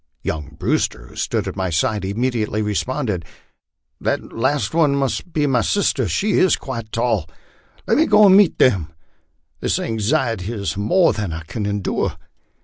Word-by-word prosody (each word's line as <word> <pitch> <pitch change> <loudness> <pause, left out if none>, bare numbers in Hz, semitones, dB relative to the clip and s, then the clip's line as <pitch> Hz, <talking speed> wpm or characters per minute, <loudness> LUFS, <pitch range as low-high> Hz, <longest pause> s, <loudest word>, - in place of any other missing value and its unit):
Young 75 -1 -4
Brewster, 60 0 -1
who - - -16
stood - - -2
at - - -5
my 95 -1 -2
side, 105 +6 0
immedi 110 +3 -1
ately 105 +1 -2
responded, 105 - -2 0.8
"The - - 0
last 130 -1 -2
one 155 -4 +3
must 140 +5 -2
be 150 -2 +1
my 130 -4 +2
sister; 135 - +1
she 200 - +1
is 185 - +4
quite 115 -5 -7
tall. 115 -9 0 0.6
Let - - +2
me 315 +2 +4
go 210 0 +6
and 190 -1 +7
meet 200 -3 +5
them; 85 -10 +2 0.7
this - - 0
anxiety 115 -1 -1
is 100 -4 -3
more 140 - +3
than 105 -4 -3
I 80 +1 -5
can 100 +6 -4
endure." 100 -4 -2
115 Hz, 165 wpm, -20 LUFS, 100-140 Hz, 0.8 s, and